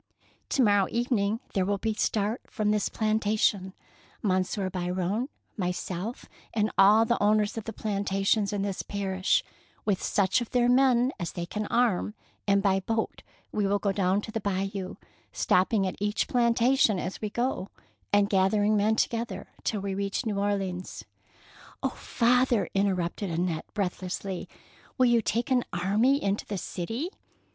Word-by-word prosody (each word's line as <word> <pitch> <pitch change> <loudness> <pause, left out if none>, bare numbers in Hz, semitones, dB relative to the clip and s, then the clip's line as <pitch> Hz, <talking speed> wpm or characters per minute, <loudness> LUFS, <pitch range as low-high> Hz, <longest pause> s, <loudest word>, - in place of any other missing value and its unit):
To 265 - +3
morrow 205 -3 +4
evening 230 -2 0
there 190 - +2
will 200 +1 0 0.2
start 215 +2 0
from 210 -1 0
this 210 -1 +1
plantation 215 -3 +1 0.5
Monsieur 190 0 0
Biron, 185 +6 -2 0.3
myself, 180 +3 -3 0.3
and 215 -1 +1
all 210 +3 +6
the 235 +1 0
owners 210 0 +3
of 225 -2 -5
the 225 - -4
plantations 200 0 0
in 205 -1 -1
this 200 -2 -2
parish, 195 - 0 0.4
with 200 -3 +1
such 195 +3 +2
of 240 - -4
their 245 -1 +2
men 250 0 +4
as 170 - -4
they 175 -2 -4
can 210 +4 -4
arm, 225 -3 +1 0.3
and 200 0 +3
by 195 -1 +3
boat 225 +3 -2 0.3
we 205 -2 0
will 200 +1 +2
go 200 0 0
down 195 0 +1
the 220 +1 -4
Bayou, 195 -1 -3 0.4
stopping 195 +2 +2
at 185 - -3
each 210 0 0
plantation 235 -1 +3
as 180 +1 -4
we 215 - -2
go, 240 -4 -2 0.4
and 205 0 +4
gathering 205 +2 +3
men 210 +2 +3
together 230 +1 -2
till 210 -3 -1
we 195 0 -3
reach 200 +5 -2
New 205 -3 -1
Orleans.^' 195 -3 -2 0.4
" - - -22
Oh, - - +2
father! 245 -1 +2
interrupted 195 -1 0
Annette, 165 -1 -1
breathlessly, 185 -1 -3 0.5
"will 255 - +5
you 240 -1 +4
take 235 +4 -1
an 250 -2 +3
army 210 +10 +2
into 200 +1 -1
the 205 - -3
city? 225 - -4
205 Hz, 150 wpm, -28 LUFS, 190-225 Hz, 0.5 s, all